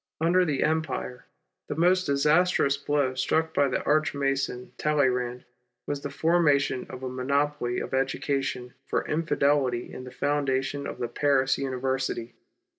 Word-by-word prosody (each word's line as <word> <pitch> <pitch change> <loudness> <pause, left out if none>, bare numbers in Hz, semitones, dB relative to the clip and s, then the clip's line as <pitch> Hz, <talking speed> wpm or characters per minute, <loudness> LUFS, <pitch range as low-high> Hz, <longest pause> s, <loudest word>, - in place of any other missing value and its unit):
Under 175 +3 +3
the 145 -5 0
Empire, 155 -5 -2 0.4
the - - -3
most 180 +3 +3
disastrous 150 +1 +3
blow 140 -1 0
struck 160 +5 0
by 140 - +3
the 130 - -2
Arch 150 0 +2
Mason 135 -3 -1
1 150 - +2
alleyrand 125 -3 0 0.4
was 145 -1 -3
the 145 - -4
formation 145 -4 +2
of 130 - -8
a - - -2
monopoly 130 0 -1
of - - -6
education 135 -1 -1
for - - -1
Infidelity 140 -6 +1
in 130 - -7
the 130 - -8
foundation 140 +1 -1
of - - -6
the 120 - -2
Paris 135 +1 +1
University. 130 -2 -2
140 Hz, 145 wpm, -27 LUFS, 130-150 Hz, 0.4 s, Under